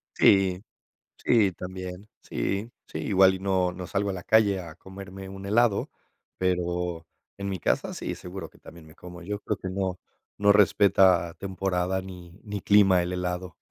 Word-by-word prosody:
Sí, 95 -1 +4 0.5
sí, 105 -5 +3
también, 95 +2 -8
sí, 100 +4 -3 0.2
sí, - - -7
igual. 95 -2 +4
Y - - -7
no, 95 -2 +1
no 90 -1 -7
salgo 100 0 -1
a - - -2
la 90 -1 -7
calle 105 -3 +3
a 85 -3 -9
comerme 95 0 -10
un 95 0 -9
helado, 110 0 +2 0.5
pero 90 -2 -1 0.3
en 100 0 -4
mi 95 -3 -3
casa - - 0
sí, - - -4
seguro 90 +2 -8
que - - -22
también 85 -2 -14
me 80 - -16
como 90 0 -11
yo 105 +3 -4
creo 105 - -3
que 95 - -6
no, 95 -1 -2 0.4
no 100 0 +5
respeta 95 -3 +4
temporada 95 0 -2
ni, 90 -1 -11
ni 105 -2 -5
clima 95 -3 +5
el 90 +1 -3
helado. 90 0 -4
95 Hz, 170 wpm, -26 LUFS, 90-100 Hz, 0.5 s, no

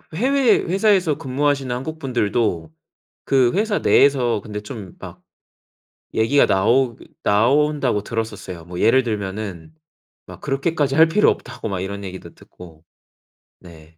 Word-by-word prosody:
해외 260 +5 +3
회사에서 190 -4 +1
근무하시는 135 -1 -1
한국 155 +6 -6
분들도 105 - -1 0.5
그 130 -3 +3
회사 210 0 0
내에서 125 -6 +3
근데 105 +1 -7
좀 105 -3 -9
막 - - -11 0.9
얘기가 115 +6 +3
나오 120 +5 +2 0.3
나온다고 130 +2 +2
들었었어요. 105 -6 -5
뭐 90 +1 -7
예를 130 +3 +4
들면은 100 -7 -5 0.5
막 - - -12
그렇게까지 140 0 -1
할 160 +2 +6
필요 210 +6 +4
없다고 - - -6
막 95 -3 -3
이런 100 +2 -5
얘기도 95 -1 -9
듣고. 80 -3 -16 0.8
네. 80 -2 -16
120 Hz, 290 characters per minute, -20 LUFS, 100-145 Hz, 0.9 s, 할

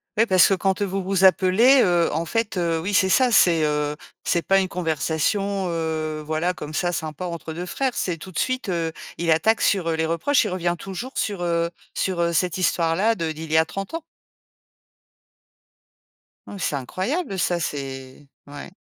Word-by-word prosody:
Ouais 225 +2 +3
parce 185 -3 +6
que - - +2
quand 190 +1 0
vous 195 0 -2
vous 190 0 0
appelez, 195 +8 +5
heu, 175 -2 +2
en 165 +2 -1
fait, 220 +3 -2
heu, 170 -2 0
oui, 190 +5 -3
c'est 190 -1 +3
ça, 255 +5 +4
c'est, 170 -7 +5
heu, 150 0 -1 0.3
c'est 170 - 0
pas 195 0 +3
une 190 - 0
conversation 180 +4 -1
heu, 160 -2 -2
voilà 160 +4 -1
comme 155 -2 -8
ça, 175 +1 0
sympa 155 +1 -4
entre 170 -2 -6
2 175 +3 -5
frères. 260 +6 -2
C'est 180 -3 -2
tout 185 +4 -10
de 165 - -9
suite, 255 -5 -1
heu, 165 -2 -1 0.3
il 170 -1 0
attaque 215 +8 +3
sur, 190 -5 +2
heu, 165 - 0
les 160 0 0
reproches. 170 - +2
Il 210 - -2
revient 175 -1 -1
toujours 195 +9 -7
sur, 200 -4 -2
heu 170 -1 0 0.2
sur, 185 -3 -1
heu, 170 0 +1
cette 180 +2 0
histoire-là 180 +5 +2
de 165 -5 -2
d'il 155 0 -8
y 160 - +4
a 160 - +5
30 195 - -6
ans. 330 - -4 2.5
Hein, 205 - -8
c'est 150 - -1
incroyable, 190 - -3
ça, 175 -1 +1
c'est. 135 -2 -6 0.2
Ouais. 145 +5 -10
175 Hz, 190 wpm, -23 LUFS, 160-195 Hz, 2.5 s, parce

